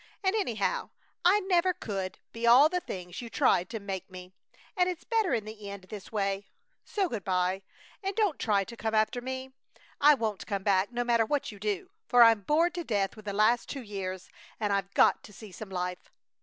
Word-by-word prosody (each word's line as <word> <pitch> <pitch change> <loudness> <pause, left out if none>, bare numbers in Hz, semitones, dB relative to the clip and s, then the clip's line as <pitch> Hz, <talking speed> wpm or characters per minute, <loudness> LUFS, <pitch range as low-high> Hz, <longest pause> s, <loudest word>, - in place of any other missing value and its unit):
And, 380 +2 +2
anyhow, 235 - -1 0.3
I 390 +4 +5
never 365 -1 +2
could 195 -4 -4
be 230 +1 -2
all 260 +6 +8
the 360 +1 0
things 180 - -7
you 235 - -7
tried 180 -3 +2
to 225 - -4
make 195 -2 -5
me, 185 0 -11 0.4
and 360 -2 +3
it's 355 -2 -5
better 445 -6 +1
in 225 -4 0
the 215 -1 -8
end 200 -1 -8
this 205 -3 -8
way. 200 -2 -1 0.4
So 395 -3 -1
good 225 - -4
by, 185 0 0 0.4
and 390 0 -3
don't 420 -8 +1
try 205 -3 +2
to 235 +4 -10
come 220 -1 -2
after 220 +3 +1
me. 260 +1 -5 0.5
I 295 +1 +7
won't 220 -5 -3
come 200 -2 -2
back, 195 +1 +2
no 245 0 -1
matter 235 -2 +2
what 290 -2 -1
you 205 - -12
do, 205 -2 -3 0.2
for 245 -1 +7
I'm 225 -2 +6
bored 325 - +2
to 350 - -4
death 200 - -1
with 215 -2 -13
the 200 - -3
last 215 +4 +3
two 275 -3 -5
years 190 -3 -6 0.3
and 210 -2 0
I've 195 0 -1
got - - +5
to 210 - -14
see 215 0 -11
some 205 +2 -9
life! 180 -1 -4
220 Hz, 210 wpm, -29 LUFS, 195-270 Hz, 0.5 s, all